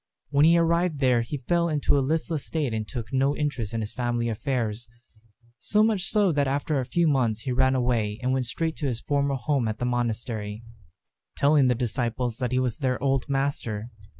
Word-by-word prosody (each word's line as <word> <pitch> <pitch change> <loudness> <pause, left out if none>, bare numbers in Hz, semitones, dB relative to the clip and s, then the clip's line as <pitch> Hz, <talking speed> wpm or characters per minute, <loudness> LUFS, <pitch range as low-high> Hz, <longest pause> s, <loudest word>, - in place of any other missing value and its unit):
When 145 +1 +5
he 170 +1 +6
arrived 170 -2 +1
there, 125 -3 +3
he 130 +3 -5
fell 170 -1 +2
into 150 -2 +1
a 140 - +3
listless 155 +2 -1
state 150 -7 -2
and 110 -1 -3
took 120 0 -6
no 135 +2 +2
interest 135 -8 -2
in 115 - -2
his 110 +1 -4
family 120 -1 -1
affairs. 115 0 -2 0.7
So 210 0 +2
much 215 -4 +1
so, 205 0 +2
that 145 -2 +1
after 140 +2 0
a 130 - -2
few 170 +7 +1
months 120 -7 +1
he 130 - -3
ran 130 +1 +3
away 115 -5 0
and 130 +1 +1
went 130 -2 -1
straight 160 +5 -2
to 145 - -2
his 120 -3 -2
former 140 -1 0
home 130 -1 0
at 110 0 -3
the 125 - -2
monastery, 115 -3 -2 0.7
telling 140 -1 +4
the 125 - +3
disciples 120 0 -2
that 125 -2 -2
he 125 - +1
was 125 -1 -1
their 130 -3 0
old 135 0 0
master. 125 -5 -2
130 Hz, 205 wpm, -26 LUFS, 120-145 Hz, 0.7 s, he